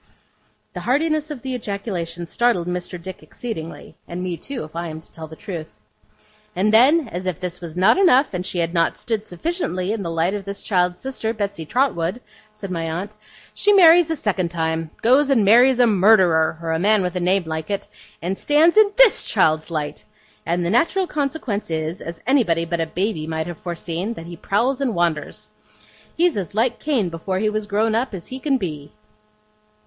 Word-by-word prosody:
The - - -5
heartiness 310 +4 0
of 285 -6 -7
the 260 -1 -3
ejaculation 195 -7 -4
startled 235 -1 +1
Mr. 180 0 -4
Dick 185 +2 -9
exceedingly; 165 -9 -8
and 175 +1 -5
me, 180 -2 -2
too, 270 +9 -6
if 155 +1 -12
I 170 0 -3
am 160 -1 -7
to 160 - -17
tell 160 -1 -9
the 160 - -11
truth. 160 - -8 0.8
'And 205 +4 +1
then, 275 +6 +5
as 180 +2 -5
if 180 -4 -2
this 180 -1 -5
was 170 -1 -8
not 190 - +4
enough, 280 - +4
and 180 0 -2
she 185 - -3
had 170 0 0
not 170 -1 +1
stood 220 -3 -3
sufficiently 185 - -2
in 220 -1 -2
the 170 - -4
light 165 +3 0
of 205 -1 -4
this 200 +1 -6
child's 180 -3 +1
sister, 235 -4 -3
Betsey 200 -6 -4
Trotwood,' 220 - 0 0.3
said 200 -2 -8
my 165 -2 -2
aunt, 190 +6 -5 0.4
'she 415 - +3
marries 345 -3 +7
a 325 - 0
second 195 - -1
time 160 -1 -2
goes 270 +5 +4
and 235 -7 +3
marries 245 +5 +6
a 245 - +6
Murderer 185 -7 +4
or 165 - -2
a 160 - 0
man 205 +2 +3
with 180 -1 -3
a - - 0
name 185 +2 +2
like 160 -1 -4
it 200 -1 -3 0.4
and 185 +3 -1
stands 315 +5 +3
in 430 -2 +6
THIS - - +6
child's 155 -6 +2
light! 150 -3 -4 0.4
And 170 +1 0
the 170 - 0
natural 335 - +2
consequence 275 - -3
is, 160 +3 -3
as 170 0 -8
anybody 220 -11 +2
but 170 0 -2
a 165 - -1
baby 180 -2 -2
might 160 0 -2
have 175 -1 -7
foreseen, 175 +4 -4
that 165 - -9
he 170 0 -8
prowls 240 +10 0
and 250 -5 0
wanders. 170 -3 -2 0.7
He's 345 -4 +2
as 195 0 -4
like 235 +2 +1
Cain 255 - 0
before 170 +3 -3
he 215 +2 0
was 215 -1 -3
grown 215 +2 +1
up, 230 -1 -1
as 170 - -9
he 260 - -6
can 275 0 +1
be. 150 - -6
190 Hz, 200 wpm, -21 LUFS, 170-245 Hz, 0.8 s, marries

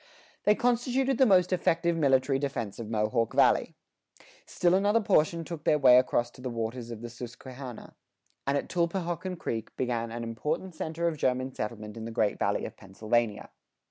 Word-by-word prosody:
They 210 - +5
constituted 245 +2 +1
the 265 - +6
most 185 -2 +4
effective 170 -1 +1
military 135 -3 +2
defense 120 -8 -3
of 110 -2 -6
Mohawk 110 +1 0
Valley. - - +3 0.7
Still 175 0 +2
another 205 +4 +3
portion 165 -5 +2
took 165 -2 -7
their 150 - +3
way 125 -3 +7
across 120 -1 0
to 125 - -15
the 130 - -3
waters 115 +1 -4
of 115 -2 -7
the 120 - -5
Susquehanna, 125 +1 -9 0.5
and 140 +1 +2
at - - -3
Tulpehockon 175 +1 -2
Creek 115 -7 -4
began 120 -2 -1
an 120 0 -5
important 150 +11 -3
center 165 +1 -2
of 165 -2 -1
German 130 -1 0
settlement 105 -1 -5
in 110 - -6
the - - -5
Great 110 -2 0
Valley - - 0
of - - -8
Pennsylvania. 110 +3 -2
130 Hz, 175 wpm, -28 LUFS, 115-170 Hz, 0.7 s, way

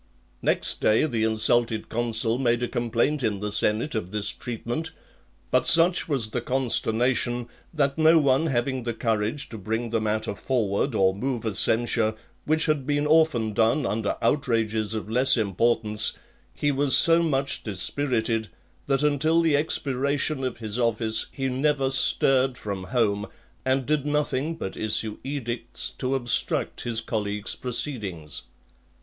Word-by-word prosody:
Next - - 0
day 110 +7 +3
the 115 -7 -1
insulted 110 +1 +1
consul 115 0 +1
made 120 -2 +1
a - - 0
complaint 120 +6 -1
in 105 -5 -1
the 105 +1 -4
senate 110 +8 0
of 110 -6 -3
this 105 0 +1
treatment; 120 +7 -5 0.6
but - - +2
such 170 +1 +5
was 125 -7 0
the 120 - -2
consternation, 120 -1 +1 0.2
that 140 -2 -1
no 160 +1 +6
one 140 +1 +2
having 130 -1 -1
the 120 -1 -4
courage 115 +4 -1
to 110 - -8
bring 110 +4 -3
the 115 -1 0
matter 110 -1 -1
forward 110 +1 -1
or 95 -2 +3
move 120 +3 -3
a 110 - -1
censure, 115 +1 +1 0.3
which 155 +1 +2
had 150 -4 -1
been 145 0 0
often 150 -8 +2
done 115 +6 +2
under 110 -2 -2
outrages 115 -5 0
of 110 - -5
less 125 +4 +3
importance, 110 +1 0 0.4
he 145 - -1
was 140 0 +4
so 165 0 +6
much 140 -4 -1
dispirited, 110 +2 -1 0.4
that 135 +1 +2
until 150 +3 +2
the 160 -3 +2
expiration 140 -1 -1
of 130 -2 -3
his 110 0 -4
office 110 -1 0
he 135 -1 -3
never 135 +1 0
stirred 135 0 +3
from 100 -5 -5
home, 105 -3 0 0.4
and 130 0 0
did 150 0 0
nothing 150 +1 -1
but 95 -12 -6
issue 110 0 -2
edicts 120 -4 -4
to 130 0 -2
obstruct 120 -3 0
his 115 -2 -1
colleague's 105 -2 -3
proceedings. 105 - -4
120 Hz, 150 wpm, -25 LUFS, 110-140 Hz, 0.6 s, no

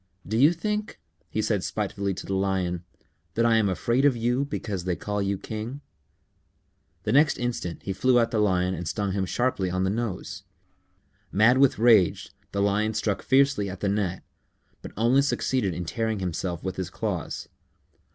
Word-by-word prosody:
"Do 110 - -2
you 140 +7 +6
think," 210 +4 -3 0.3
he - - -1
said - - 0
spitefully 100 -1 -2
to - - -7
the 95 - -3
Lion, 95 -3 0 0.5
"that 115 - +2
I 115 -1 +4
am 105 -3 +2
afraid 120 +7 +1
of 140 -4 +4
you 120 +4 +1
because 105 -10 -4
they 90 -1 0
call 105 +2 -3
you 100 0 0
king?" 110 +7 -6 1.2
The 105 - -1
next 150 +4 +4
instant 120 -9 -3
he 95 - -2
flew 125 +6 +3
at 115 -1 +2
the 110 - +1
Lion 95 -3 +2
and 90 -2 -5
stung 100 +2 -1
him 95 -1 -1
sharply 120 -4 0
on 90 +1 -1
the 95 - +1
nose. 110 -3 -4 0.9
Mad 115 +6 +5
with 140 -1 +4
rage, 110 -6 +4 0.2
the 100 0 0
Lion 105 +2 +1
struck 105 -2 -1
fiercely 135 -7 +3
at 95 -1 -8
the 100 - +1
Gnat, 95 -3 -1 0.6
but - - -8
only 120 +5 +4
succeeded 130 -8 0
in 90 +1 -4
tearing 110 +4 -1
himself 90 -2 -3
with 95 0 -4
his 95 -2 -3
claws. 95 -5 -4
105 Hz, 180 wpm, -26 LUFS, 95-120 Hz, 1.2 s, you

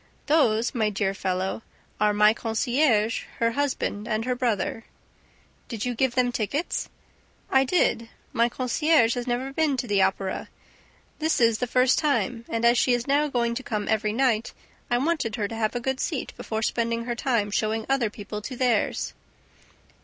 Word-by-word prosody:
"'Those,' 235 -7 +2
my 220 -3 +1
dear 195 -1 -1
fellow, 190 +2 -2 0.4
are 210 0 +3
my 210 +1 +5
concierge, 230 0 +1
her 230 0 +2
husband 255 -5 -2
and 220 0 -1
her 250 - 0
brother." 230 -3 -1 0.8
"Did 230 -2 -4
you 250 - -1
give 245 +1 0
them 255 -1 +3
their 245 - -1
tickets?" 260 - -2 0.6
"I 265 0 +4
did... 255 -6 +1 0.2
My 235 +1 +3
concierge 255 0 +2
had 245 0 -4
never 255 +3 -2
been 300 -3 +1
to 250 - -2
the 205 -4 +2
Opera 190 0 -1 0.7
this 315 +1 +1
is, 230 -2 +3
the 250 - -1
first 255 +1 +3
time 260 -6 0
and, 230 0 -1
as 235 0 +5
she 250 - +3
is 240 0 0
now 285 +2 +2
going 235 -4 0
to 245 - -4
come 210 -5 -3
every 215 -1 +1
night, 235 -1 +1 0.4
I 240 - +2
wanted 280 -4 0
her 210 -4 -1
to 225 - -7
have 220 +1 -1
a - - 0
good 265 +2 -2
seat, - - -3
before 220 0 -4
spending 230 +1 0
her 240 - -2
time 235 -4 0
showing 215 +2 -1
other 270 -5 +1
people 210 0 -7
to 255 +5 -6
theirs." 240 -4 0
235 Hz, 180 wpm, -25 LUFS, 215-260 Hz, 0.8 s, my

